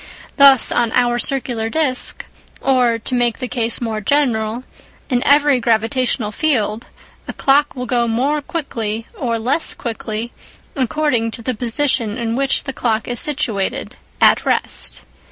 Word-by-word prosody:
Thus 275 -4 +6
on 235 -2 +1
our 240 -1 +2
circular 240 -4 -2
disc, 260 -1 -1 0.3
or, 250 -3 +2
to 230 +3 -3
make 240 -2 +1
the 255 - -4
case 235 -3 0
more 225 -3 -3
general, 235 -2 0 0.5
in 245 -1 +2
every 285 -2 +4
gravitational 230 0 0
field, 225 -4 -1 0.4
a - - -5
clock 285 +2 +2
will 250 -1 -4
go 240 -1 0
more 270 +7 0
quickly 230 -8 -4
or 235 -3 -2
less 280 +10 +1
quickly, 230 -6 -5 0.4
according 260 -3 0
to 230 +1 -5
the 255 - -1
position 235 -1 0
in 230 -2 -2
which 275 +1 +2
the 270 - -5
clock 225 -3 -1
is 240 -1 -1
situated 240 -10 -1 0.2
(at - - +5
rest). - - -1
245 Hz, 145 wpm, -18 LUFS, 225-275 Hz, 0.5 s, Thus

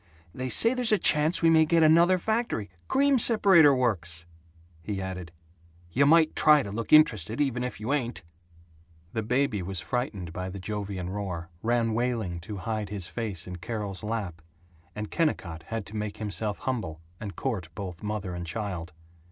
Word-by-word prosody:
They 130 0 -4
say 230 - +6
there's 250 -3 0
a 215 - +5
chance 155 0 +3
we 165 - +6
may 160 -1 +6
get 165 +1 +3
another 170 +4 +5
factory 220 - -2 0.2
cream 275 -1 +3
separator 195 -10 +6
works!" 90 -10 -1 0.6
he 100 +2 -4
added, 90 -3 -6 0.6
"You 140 +9 +3
might 160 +1 +5
try 150 -2 +5
to 100 - -6
look 115 +1 -5
interested, 115 -6 +4
even 130 -4 0
if 125 - -5
you 115 +6 -2
ain't!" 125 -8 -2 0.9
The 110 - -1
baby 125 -2 0
was 90 0 -3
frightened 100 -9 -3
by 90 +1 -4
the 95 - -7
Jovian 95 -2 -4
roar; 90 -4 -5
ran 115 -1 +1
wailing 115 -7 -1
to 100 +5 -7
hide 110 -3 -2
his 100 -3 -4
face 100 -4 -4
in 90 -1 -7
Carol's 100 0 -5
lap; 105 -6 -4 0.5
and 105 0 -5
Kennicott 85 - -1
had 115 0 -4
to 110 - -11
make 105 -1 -4
himself 105 0 -3
humble 115 - -4 0.2
and 100 -3 -7
court 105 -12 -3
both 90 -4 -7
mother 105 -3 -4
and 90 0 -6
child. 90 -2 -5
110 Hz, 170 wpm, -27 LUFS, 95-140 Hz, 0.9 s, say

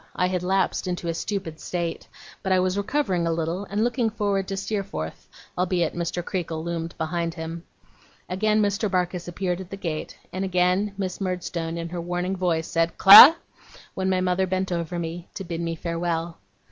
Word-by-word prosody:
I 180 - +1
had 180 -1 -1
lapsed 190 +1 0
into 175 -1 -3
a - - 0
stupid 170 -3 -4
state; 170 0 -4 0.3
but 190 - -2
I 185 - +4
was 185 0 +1
recovering 200 -5 0
a - - +1
little 165 +4 -2
and 205 +2 -1
looking 240 -1 +1
forward 200 -3 -1
to 195 - -3
Steerforth, 190 - -4 0.3
albeit 180 -2 0
Mr. 175 0 -3
Creakle 165 -3 -3
loomed 170 -1 -4
behind 165 +1 -2
him. 165 0 -6 0.6
Again 215 +3 +1
Mr. 205 +1 0
Barkis 180 -1 -1
appeared 180 0 -2
at 185 - -10
the 195 - -7
gate, 160 -5 -5 0.2
and 185 +1 -2
again 185 +2 +1
Miss 190 -1 -4
Murdstone 175 -3 -3
in 170 0 -4
her 175 0 -4
warning 175 +2 -2
voice, 170 -3 0
said: 165 0 0
'Clara!' 225 +11 +11 0.6
when 190 0 -1
my 185 -1 +1
mother 185 +1 +1
bent 185 0 -1
over 170 0 -2
me, 170 +1 -5
to 195 - -5
bid 170 -2 -4
me 165 0 -2
farewell. 170 0 -3
180 Hz, 185 wpm, -24 LUFS, 170-190 Hz, 0.6 s, Clara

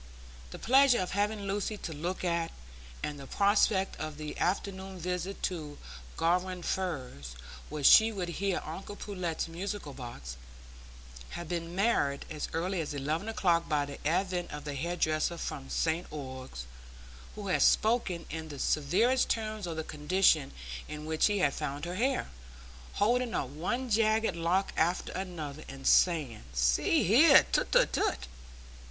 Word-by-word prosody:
The - - -8
pleasure 265 +1 +5
of 185 - -2
having 205 +1 0
Lucy 200 +2 -2
to 165 - -6
look 175 +6 -4
at, 170 -1 0 0.5
and 145 -1 -3
the 135 - -9
prospect 200 0 +2
of 155 -1 -5
the 155 -1 -6
afternoon 190 0 -2
visit 180 +2 -4
to 155 -5 -3 0.4
Garum 180 +1 0
Firs, 130 - -3 0.3
where 150 -1 -5
she 220 +10 +8
would 185 -5 -3
hear 195 -2 0
uncle 190 +6 -7
Pullet's 180 -7 -3
musical 180 -2 -5
box, 70 - -8 1.0
had 175 - -6
been 170 0 -4
marred 165 -10 +1
as 155 -1 -3
early 180 +2 -1
as 150 -2 -4
eleven 155 +9 -2
o'clock 175 -6 +1
by 150 -2 +1
the 140 0 -8
advent 180 +1 0
of 150 0 -7
the 145 -1 -4
hair 170 +6 -2
dresser 155 0 0
from 135 -4 -5
St 165 +2 0
Ogg's, 130 - -7 0.7
who 205 -2 -5
had 180 - +2
spoken 215 -7 +3
in 160 0 -5
the 145 - -7
severest 195 - +2
terms 215 -3 -2
of 165 -1 -4
the 160 - -2
condition 155 -1 +2 0.4
in 150 0 -7
which 160 0 +2
he 205 -1 0
had 145 -7 +2
found 145 +3 -4
her 175 - -4
hair, 255 - 0 0.6
holding 240 +3 +1
up 130 - -1
one 240 - -2
jagged 220 -3 +2
lock 170 +4 0
after 175 +3 +1
another 160 -6 -5
and 135 0 -9
saying, 155 -10 +3
"See - - +3
here! - - +7
tut, - - +1
tut, - - +4
tut!" 65 - 0
170 Hz, 155 wpm, -30 LUFS, 150-195 Hz, 1.0 s, she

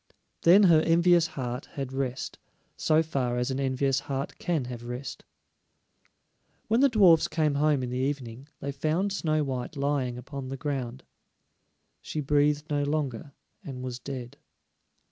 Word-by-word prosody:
Then 185 +5 +7
her 165 -5 +6
envious 170 +1 +4
heart 125 -4 -5
had 135 -2 -5
rest, 130 -1 -3 0.4
so 155 +1 +3
far 130 -6 -1
as 125 +2 0
an 130 - -2
envious 135 0 +1
heart 140 0 -4
can 165 -7 -1
have 120 -1 -7
rest. 125 +3 -6 1.4
When 225 +2 +3
the 280 +1 +6
dwarfs 190 -9 +5
came 155 -3 +1
home 145 -1 +2
in 125 - -4
the 125 - -2
evening, 130 -2 -3
they 140 - -3
found 160 +8 0
Snow 155 -5 0
white 130 +2 -4
lying 140 -3 0
upon 135 +1 -7
the 135 - -4
ground; 130 -3 -4 1.0
she 155 - -5
breathed 145 +1 +2
no 145 -1 0
longer, 145 -1 -2 0.3
and 130 -2 -7
was 125 -1 -5
dead. 125 -2 -7
140 Hz, 150 wpm, -28 LUFS, 130-155 Hz, 1.4 s, Then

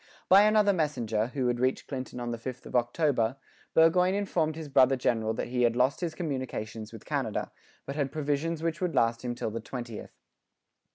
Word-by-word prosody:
By 195 +2 +7
another 210 -1 +4
messenger, 120 - 0
who 125 -1 0
reached 130 +2 0
Clinton 130 -2 -5
on 120 -1 -3
the 115 - -4
5th 130 +1 -7
of - - -8
October, 120 -1 +1 0.4
Burgoyne 180 +3 +5
informed 170 -6 0
his 160 -1 -6
brother 135 -1 +5
general 115 -3 0
that - - -3
he 125 0 -1
had 120 -1 +3
lost 130 +6 +2
his 165 -3 -2
communications 125 -8 -4
with 115 -2 -11
Canada, 135 -8 -2 0.3
but 140 - -5
had 140 -3 -1
provisions 155 +2 -1
which 165 +1 -2
would 180 -2 -1
last 115 +1 +2
him 120 -1 -3
till 110 - -3
the 115 +1 -4
20th. 120 -2 -7
130 Hz, 185 wpm, -29 LUFS, 120-160 Hz, 0.4 s, By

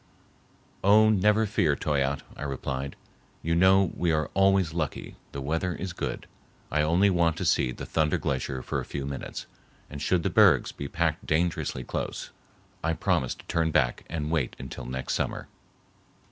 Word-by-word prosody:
"Oh, 110 +2 +6
never 105 +2 +3
fear, 80 -7 +2
Toyatte," 70 -2 0
I - - -11
replied. 70 -1 -3 0.5
"You 85 - 0
know 95 +2 +5
we 85 -1 +1
are 75 -1 0
always 95 -3 +3
lucky—the 75 -3 -5
weather 80 +5 -1
is 90 +3 -5
good. - - -4 0.5
I 75 - +2
only 85 +6 +3
want 85 -3 +2
to - - -2
see 60 - +2
the - - -7
Thunder 80 -1 +1
Glacier 65 -1 -2
for - - -2
a - - -4
few 70 -2 -5
minutes, 70 -1 -5 0.5
and 75 -1 -6
should 90 0 +1
the - - 0
bergs - - +5
be 70 - -6
packed 85 +1 -1
dangerously 80 -5 0
close, - - -4 0.5
I 80 +1 +1
promise 65 -5 0
to - - -16
turn 80 -1 +1
back 70 -6 +1
and 75 -2 -3
wait 75 -7 0
until 65 -2 -7
next 65 0 -3
summer." - - -2
80 Hz, 165 wpm, -27 LUFS, 70-90 Hz, 0.5 s, Oh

